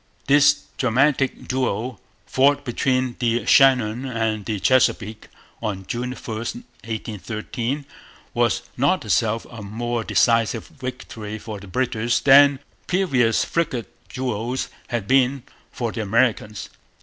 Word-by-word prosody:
This 145 +1 +5 0.2
dramatic 135 +2 +1
duel, 125 -3 -2 0.2
fought 140 +2 +2
between 130 0 0
the 120 -2 0
Shannon 125 -3 +4
and 115 -4 -2
the 110 -3 -2
Chesapeake 110 0 +1 0.3
on 100 -4 -4
June 125 +4 -3
1, - - -10
1813, 115 - -5 0.5
was 120 0 +1
not 140 +4 +1
itself 105 +4 +1
a 115 -2 -8
more 115 +3 -3
decisive 115 +2 +2
victory 110 -4 -7
for 110 -1 -7
the 100 - -12
British 120 +1 0
than 140 0 +7 0.3
previous 135 -12 +2
frigate 135 -9 -2 0.2
duels 125 0 -3 0.2
had 120 -5 -3
been 135 0 +3 0.3
for 120 -3 -3
the 115 - -4
Americans. 110 -1 0
120 Hz, 115 wpm, -22 LUFS, 110-130 Hz, 0.5 s, than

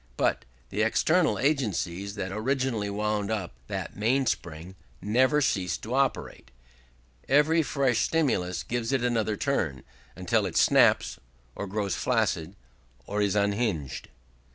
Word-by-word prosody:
But - - 0 0.2
the 105 - -2
external 155 +10 +2
agencies 100 - -1
that 95 -2 -4
originally 115 -1 -1
wound 105 0 -1
up 100 - -3
that - - -5
mainspring 100 -8 -1 0.3
never 130 +8 +2
cease 90 -9 0
to 115 - -7
operate; 135 - -1 0.8
every 150 +4 +4
fresh 135 -6 +1
stimulus 90 - 0
gives 120 - -2
it 135 -3 +1
another 110 -3 0
turn, 80 - -1 0.3
until - - 0
it - - -3
snaps, - - +4 0.3
or 100 - -5
grows 100 0 -2
flaccid, 100 -7 0 0.5
or 105 +1 -2
is 100 0 +1
unhinged. 100 - -1
110 Hz, 125 wpm, -27 LUFS, 95-130 Hz, 0.8 s, every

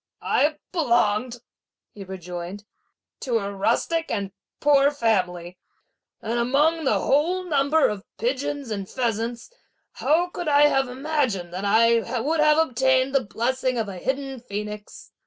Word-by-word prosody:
"I 300 +1 +2
belonged," 240 - +1 0.5
he 200 - -9
rejoined, 180 +1 -7 0.5
"to 240 -3 0
a 200 -2 -3
rustic 235 +11 0
and 200 -3 -2 0.3
poor 285 -1 +4
family; 180 -10 -1 0.6
and 235 +2 -1
among 295 +6 +2
that - - +3
whole 340 +7 +1
number 300 -2 +2
of 205 -2 -4
pigeons 265 +2 -2
and 200 -3 -4
pheasants, 235 - -3 0.4
how 345 +4 +1
could 350 -1 -6
I 290 0 +5
have 270 -3 +3
imagined 255 - -2
that 190 +3 -4
I 230 +3 +3
would 310 +7 0
have 305 0 +5
obtained 265 -3 +2
the 275 -2 +2
blessing 255 +3 -1
of 225 -2 -1
a 190 -2 -7
hidden 270 +3 -3
phoenix! 210 -2 -7
250 Hz, 140 wpm, -24 LUFS, 210-285 Hz, 0.6 s, I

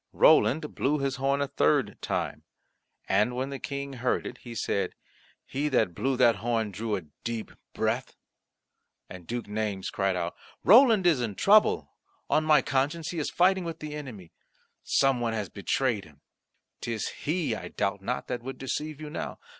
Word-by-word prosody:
Roland 150 +1 +4
blew 145 +3 +1
his 135 -2 -1
horn 140 +1 +1
a 140 - 0
third 140 0 +2
time, - - -2 0.7
and 105 +5 +2
when 130 +2 -2
the 135 - -5
King 140 0 -5
heard 125 0 -1
it 125 - -7
he 120 -2 -9
said, 100 -2 -1 0.5
"He 145 +3 -2
that 125 -9 +2
blew 130 +7 -1
that 120 -4 +5
horn 115 -1 -1
drew 105 +2 -2
a 95 - -4 0.2
deep 115 -1 -4 0.2
breath." - - -1 1.0
And 90 -3 -10
Duke 120 0 -3
Naymes 105 -2 -3
cried 95 -1 0
out, 85 -1 -3 0.3
"Roland 225 - +7
is 160 -8 +4
in 110 -4 -2
trouble; 210 - +4 0.4
on 155 - +4
my 150 -4 +5
conscience 145 +4 0
he 170 - -3
is 150 - -1
fighting 185 +1 +3
with 165 -1 -5
the 155 -1 -7
enemy. 120 - -8 0.5
Some 135 -2 +2
one 115 -1 -1
has 105 -4 -3
betrayed 110 +1 0
him; 75 -2 -19 0.6
'tis 115 -3 -2
he, 155 -4 -2
I 110 - -5
doubt 100 0 -2
not, 125 +6 -3
that 125 -1 -3
would 130 +1 -6
deceive 150 +3 -4
you 155 -1 -7
now. - - -5
130 Hz, 175 wpm, -28 LUFS, 110-150 Hz, 1.0 s, Roland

